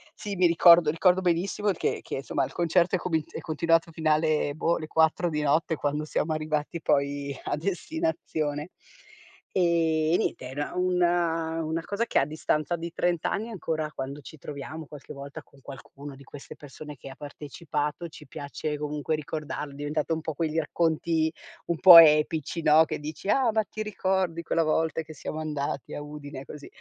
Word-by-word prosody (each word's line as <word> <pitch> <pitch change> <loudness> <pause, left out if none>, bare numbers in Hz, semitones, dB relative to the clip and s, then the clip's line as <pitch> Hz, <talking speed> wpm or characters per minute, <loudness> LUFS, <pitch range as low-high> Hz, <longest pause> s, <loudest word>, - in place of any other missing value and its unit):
Sì, 205 -1 -5
mi 180 -1 +4
ricordo 170 -1 +7
ricordo 180 +3 +3
benissimo 185 +4 0
che 180 - -1
che, 135 - -5
somma, - - -1
il - - -10
concerto 175 +2 +2
è - - -1
comi 160 -4 -1
è - - -6
continuato 165 +1 +2
alla 155 -1 +2
fine, 155 -2 +1
boh, 165 +2 +1
le 155 - -6
4 160 +2 +2
di 150 -1 -2
notte 155 +3 +1
quando 150 +1 -2
siamo 155 +1 -1
arrivati 155 +1 -2
poi 140 -1 0
a - - 0
destinazione. 175 - -2 0.9
Ehm, 190 - +3 0.5
e - - +4
niente, - - -2
era 140 +3 -4
una 175 -2 +1
una 160 +1 -2
cosa 205 +6 -2
che - - -1
a - - +2
distanza 155 +1 -1
di 170 0 -6
30 175 -2 0
anni 220 +3 -1
ancora, 160 -7 -3
quando 135 0 -6
ci 155 - -12
troviamo 150 +3 -7
qualche 145 -2 -10
volta 140 +2 -9
con 140 - -23
qualcuna 140 +1 -10
di 140 - -14
queste 140 0 -11
persone 150 +1 -10
che 135 - -10
ha 135 - -10
partecipato, 150 +2 -4
ci 155 -1 -13
piace 145 +2 -5
comunque 150 +1 -2
ricordarlo, 150 -1 -5
è - - -12
diventato 150 +2 -2
un 160 - -5
po' 160 - -4
quei 160 +1 -2
racconti 160 0 +1 0.4
un 170 - -1
po' 180 -3 +11
epici, 155 +1 +4
no, 155 +2 +6
che - - -4
dici: 155 +6 -6
"Ah, 255 -4 +3
ma 220 0 +2
ti 215 +1 -6
ricordi 190 -5 -1
quella 165 - +1
volta 160 +1 0
che 155 0 -11
siamo 155 +1 -6
andati 145 -3 -4
a 145 - -5
Udine, 145 -2 -8
così". 145 +1 -10
155 Hz, 185 wpm, -27 LUFS, 150-170 Hz, 0.9 s, po